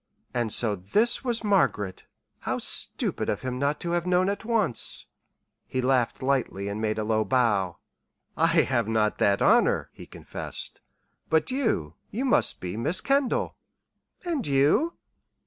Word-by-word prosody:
And 120 -3 -1
so 110 -2 +3
this 210 - +1
was 240 -3 -1
Margaret. 105 - +1 0.3
How - - -2
stupid - - -1
of 105 - -1
him 125 -1 -3
not 140 +2 0
to 170 - -3
have 175 0 0
known 180 +1 +3
at 200 - -3
once! 220 - 0 0.6
He 130 - -3
laughed 130 -1 +1
lightly 130 -7 0
and 105 +2 -4
made 110 0 -1
a 110 - -1
low 110 0 +1
bow. 105 -8 +1 0.6
"I - - +3 0.2
have - - 0
not 110 -1 +1
that 100 0 +3
honor," - - +3
he - - -12
confessed. - - -7 0.5
"But 160 +10 +2
you 225 - -1 0.2
you 250 +6 -3
must 255 - +2
be 90 +1 -5
Miss 155 +10 0
Kendall." 275 -3 +1 0.7
"And 320 -8 -2
you?" 145 - +3
130 Hz, 150 wpm, -26 LUFS, -, 0.7 s, so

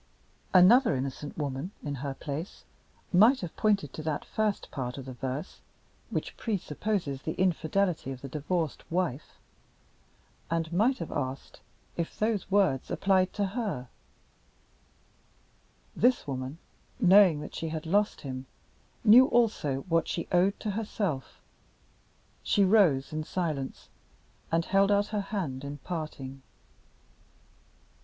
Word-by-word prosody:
Another 205 - +6
innocent 135 +2 -5
woman, 145 +2 -3
in 145 - -3
her 140 -1 -3
place, 150 +7 -6 0.5
might 225 +9 +6
have 175 -3 -6
pointed 200 - +1
to - - -6
that 155 -2 -3
first 215 -2 -1
part 125 -2 -4
of 135 - -7
the 130 - -7
verse, 130 - -5 0.5
which - - -3
pre 220 -4 -1
supposes 160 -5 -3
the 160 - -3
infidelity 180 -3 0
of 130 -1 -7
the 140 - -6
divorced 150 +3 -2
wife, 165 -6 -2 1.1
and 165 0 -1
might 235 +9 +3
have 165 - -6
asked 130 -1 -4 0.4
if 170 -1 -3
those 215 -3 0
words 190 -10 +2
applied 190 -1 +2
to 205 - 0
her. 195 - -3 2.1
This 245 +2 +3
woman, 130 +1 -4 0.4
knowing 190 -6 +6
that 150 - -8
she 165 - -4
had 155 0 -5
lost 205 +5 +1
him, 130 -1 -6 0.6
knew 240 +4 +8
also 210 - +1
what 165 -1 0
she 170 - -3
owed 185 +3 +3
to 210 - -2
herself. 200 -9 -3 1.0
She 200 - +2
rose 175 -9 +4
in 155 0 -2
silence, 155 -6 -3 0.6
and 165 0 +2
held 195 +1 +3
out 205 0 +2
her 210 - +1
hand 180 -10 -4
at 140 0 -7
parting. 145 -6 -5
165 Hz, 130 wpm, -29 LUFS, 140-200 Hz, 2.1 s, knew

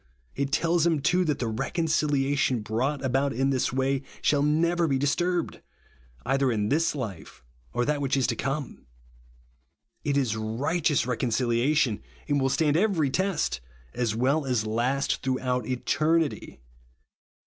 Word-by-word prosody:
It 140 0 -2
tells 170 +1 +2
him, 165 -3 +2
too, 180 +6 +2
that 150 -3 0
the 125 - -2
reconciliation 140 - 0
brought 130 +6 -2
about 135 +2 +1
in 135 +3 +1
this 130 -2 0
way 135 +1 0 0.2
shall 145 -1 +3
never 165 +3 +2
be 135 -3 +1
disturbed, 170 +5 -1 0.6
either 135 +1 +2
in 105 -2 0
this 160 +2 +1
life 105 - -7 0.3
or 120 - 0
that 150 0 0
wliich 140 -1 0
is 130 - +2
to 120 - 0
come. 135 - -4 1.2
It 140 -1 0
is 125 -6 +1
righteous 135 +7 0
reconciliation, 120 0 +1 0.3
and 145 -1 +1
will 135 - +2
stand 150 +2 +2
every 170 -8 +2
test, 180 - 0 0.3
as 115 -3 -1
well 135 +6 +1
as 120 -4 0
last 125 +6 0
throughout 125 -3 -1
eternity. 150 - 0
135 Hz, 140 wpm, -26 LUFS, 125-150 Hz, 1.2 s, shall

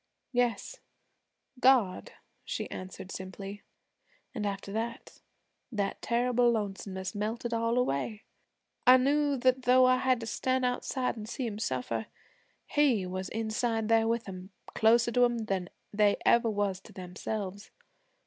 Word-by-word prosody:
'Yes, 245 -4 -1 0.8
God,' 250 -8 +3 0.3
she - - -4
answered 185 0 -7
simply. 195 +2 -7 0.7
'An' 210 -2 -2
after 195 0 -4
that, 230 +2 -5 0.5
that 200 -4 -2
terrible 245 0 +2
lonesomeness 195 -3 -4
melted 225 +3 -3
all 230 +1 +1
away. 210 - -1 0.6
I 255 +1 +10
knew 285 +2 +2
that 255 +1 +2
though 255 +1 +5
I 255 0 +5
had 255 -1 +2
to - - -4
stand 255 +3 0
outside 250 -1 -1
an' 215 - -7
see 250 +2 -4
'em 210 -2 -4
suffer, 125 - -2 0.6
He 265 -10 +2
was 185 +1 -4
inside 225 0 -1
there 225 0 +4
with 230 -1 -1
'em 185 -1 -8 0.2
closer 230 +1 +4
to 245 +1 +4
'em 240 0 +4
even 225 -2 -3
than 190 -3 -2 0.2
they 205 -1 +3
was 205 -5 +2
to - - -16
themselves. 195 +2 -5
225 Hz, 140 wpm, -30 LUFS, 195-245 Hz, 0.8 s, I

